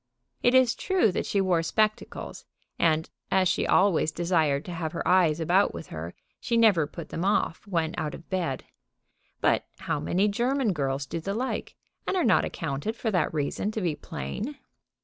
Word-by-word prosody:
It 245 +1 +4
is 255 -2 +5
true 375 - +2
that - - -2
she 200 - +1
wore 185 -3 +2
spectacles; 215 +6 -1 0.4
and, 160 -1 +2 0.2
as 190 -1 +3
she 185 - +1
always 185 -5 +3
desired 160 -4 +1
to 180 - -6
have 165 -2 -3
her 170 - -3
eyes 175 -4 +4
about 175 +5 +2
with - - -8
her, - - -6 0.2
she 235 - 0
never 200 -10 +5
put 165 +1 -9
them 165 - -3
off 200 -1 0
when 165 -4 0
out 155 -1 -3
of 165 - -13
bed. 170 -8 -2 0.8
But - - +2
how - - -2
many 190 +4 +1
German 240 +2 +1
girls 140 -2 -1
do 165 - -4
the 195 +5 -3
like, 255 +3 -3 0.3
and 385 - +1
are 355 - +2
not 225 - +4
accounted 145 +11 -3
for 225 -1 -2
that 180 -5 +1
reason 155 +6 -1
to 220 - -2
be 170 -5 0
plain? 205 - -5
180 Hz, 185 wpm, -27 LUFS, 160-215 Hz, 0.8 s, is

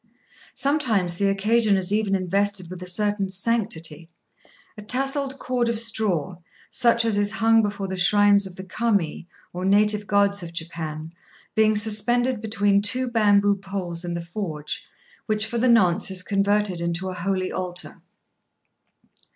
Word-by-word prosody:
Sometimes 225 - +1
the 200 - +1
occasion 210 +1 +2
is 190 +1 -1
even 210 -2 +1
invested 190 0 -1
with 185 -1 -8
a 180 - -7
certain 205 +1 0
sanctity, 180 -6 -3 0.7
a 210 - -10
tasselled 270 +4 -1
cord 250 -2 -1
of 230 - -1
straw, 210 -7 0 0.3
such 235 -1 +2
as 215 -3 +1
is 205 0 +1
hung 225 0 +4
before 205 -2 -3
the 190 - -4
shrines 200 +1 +4
of 180 - -12
the 190 - -8
Kami, 195 -5 -1 0.3
or 180 +1 -5
native 210 +1 +2
gods 200 -1 +2
of 170 -1 -8
Japan, 160 -1 -6 0.4
being 215 0 +3
suspended 225 +3 +2
between 205 -2 +1
two 255 +5 +1
bamboo 205 -3 +3
poles 190 -3 -5
in 175 -1 -4
the 170 0 -5
forge, 165 -5 -5 0.4
which 215 0 +2
for 235 +1 -3
the 250 +2 +2
nonce 190 -8 +3
is 185 -1 -2
converted 200 -2 0
into 170 +2 -2
a - - -5
holy 185 +1 -2
altar. 180 -1 -4
200 Hz, 150 wpm, -23 LUFS, 180-220 Hz, 0.7 s, hung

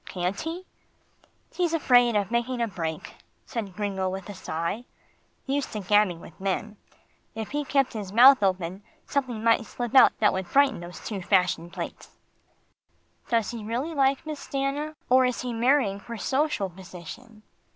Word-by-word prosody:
Can't 180 +2 -2
he?" 335 +3 -5 0.9
"He's 345 -2 0
afraid 245 -6 +4
of 205 0 0
making 240 +1 0
a 235 - +1
break," 165 -6 -5 0.3
said 205 -7 -5
Gringo 195 -3 -1
with 190 0 -6
a - - -5
sigh. 170 +6 -4 0.6
"Used 275 0 -1
to 215 - -3
gabbing 200 -3 +3
with 170 - -14
men. 200 +2 -2 0.6
If 220 -1 -5
he 295 +1 -1
kept 275 -2 +1
his 205 -4 -5
mouth 255 +3 +8
open, 185 -1 0 0.2
something 255 -6 -2
might 230 0 +4
slip 240 -2 -5
out 265 - +7
that 210 - +3
would 190 -1 -3
frighten 280 -4 +3
those 175 +1 -10
two 205 -4 -4
fashion 180 -2 +1
plates." - - -8 1.1
"Does 230 -3 +1
he 230 -3 -6
really 245 +9 -3
like 275 0 +2
Miss 305 -2 -5
Stanna, 280 +3 -2
or 255 +1 +5
is 250 -1 0
he 250 -1 -3
marrying 230 -4 +2
for 235 +3 -8
social 270 -2 0
position?" 190 +5 -11
225 Hz, 160 wpm, -26 LUFS, 195-265 Hz, 1.1 s, mouth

